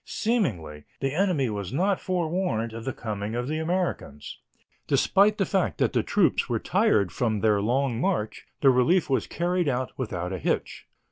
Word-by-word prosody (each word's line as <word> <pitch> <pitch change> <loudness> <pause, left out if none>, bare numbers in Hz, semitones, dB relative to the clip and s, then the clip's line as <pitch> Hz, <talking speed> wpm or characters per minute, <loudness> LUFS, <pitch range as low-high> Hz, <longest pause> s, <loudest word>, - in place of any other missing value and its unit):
Seemingly, 95 - -2
the 135 0 -1
enemy 175 -6 +1
was 100 -3 -4
not 190 +7 +1
forewarned 170 -10 -1
of 115 0 -7
the 130 - -1
coming 105 -2 -5
of 120 +1 -2
the 155 +2 -2
Americans. 160 - -3 0.5
Despite 205 +2 +3
the 195 - +1
fact 190 0 0
that - - +1
the - - +2
troops - - +1
were - - +1
tired 100 -4 +2
from 110 -4 -1
their 105 -2 +3
long 125 +2 0
march, 175 - -2
the 135 - +6
relief 135 +6 +2
was 130 - +1
carried 175 0 -1
out 130 0 -2
without 90 -8 -3
a 95 - -4
hitch. - - -2
130 Hz, 175 wpm, -26 LUFS, 110-180 Hz, 0.5 s, the